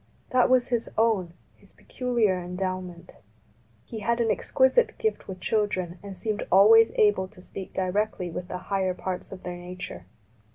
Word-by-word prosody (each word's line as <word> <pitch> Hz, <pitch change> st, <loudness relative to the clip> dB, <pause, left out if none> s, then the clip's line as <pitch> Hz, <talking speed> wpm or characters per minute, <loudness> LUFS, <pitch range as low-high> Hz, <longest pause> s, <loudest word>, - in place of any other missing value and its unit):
That 255 Hz, -1 st, +4 dB
was 255 Hz, -1 st, +3 dB
his 240 Hz, -2 st, -1 dB
own, 205 Hz, -7 st, +1 dB, 0.2 s
his -, -, -21 dB
peculiar 235 Hz, -7 st, 0 dB
endowment. 180 Hz, -1 st, -5 dB, 0.7 s
He 225 Hz, -, -7 dB
had 235 Hz, +3 st, 0 dB
an 230 Hz, -2 st, +2 dB
exquisite 355 Hz, -, +2 dB
gift 440 Hz, -1 st, -2 dB
with 185 Hz, -1 st, -7 dB
children 185 Hz, -4 st, -1 dB
and 200 Hz, -2 st, -8 dB
seemed 215 Hz, -2 st, -2 dB
alwavs 225 Hz, +4 st, +7 dB
able 205 Hz, -3 st, +3 dB
to 185 Hz, -, -18 dB
speak 185 Hz, +1 st, -9 dB
directly 190 Hz, -1 st, -1 dB
with 180 Hz, +2 st, -5 dB
the 180 Hz, -, -4 dB, 0.2 s
higher 190 Hz, -2 st, +1 dB
parts 185 Hz, 0 st, -5 dB
of 190 Hz, -1 st, -9 dB
their 180 Hz, 0 st, -5 dB
nature. 175 Hz, -, -8 dB
195 Hz, 160 wpm, -26 LUFS, 180-225 Hz, 0.7 s, alwavs